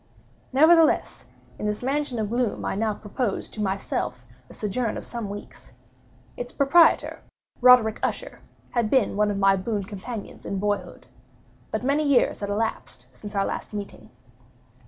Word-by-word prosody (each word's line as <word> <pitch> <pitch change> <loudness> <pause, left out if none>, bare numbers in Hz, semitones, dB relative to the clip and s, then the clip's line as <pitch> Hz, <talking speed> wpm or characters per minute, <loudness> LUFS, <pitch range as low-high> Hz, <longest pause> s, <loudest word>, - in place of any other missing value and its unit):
Nevertheless, 315 +4 +4 0.3
in 210 - -2
this 210 +3 -3
mansion 275 -1 -1
of 215 -1 -2
gloom 240 -2 -1
I - - -1
now 215 +1 -1
proposed 210 +1 -3
to 215 - -5
myself 190 -10 -2 0.2
a - - -12
sojourn 220 +2 -2
of - - -7
some 235 -4 -5
weeks. 205 +1 -10 0.6
Its 245 0 -6
proprietor, 320 +4 +4 0.4
Roderick 245 -3 +6
Usher, - - -3 0.3
had 235 -3 0
been 260 -6 +2
one 210 0 +2
of 205 - -2
my 195 0 +4
boon 200 +2 -2
companions 205 +3 -8
in 200 - -3
boyhood; 205 +1 -3 0.6
but - - -3
many 280 +4 +2
years 280 -4 +3
had 200 - -4
elapsed 205 - -3
since 205 - -10
our 195 - +2
last - - -5
meeting. 205 -1 -7
220 Hz, 155 wpm, -25 LUFS, 200-250 Hz, 0.6 s, Roderick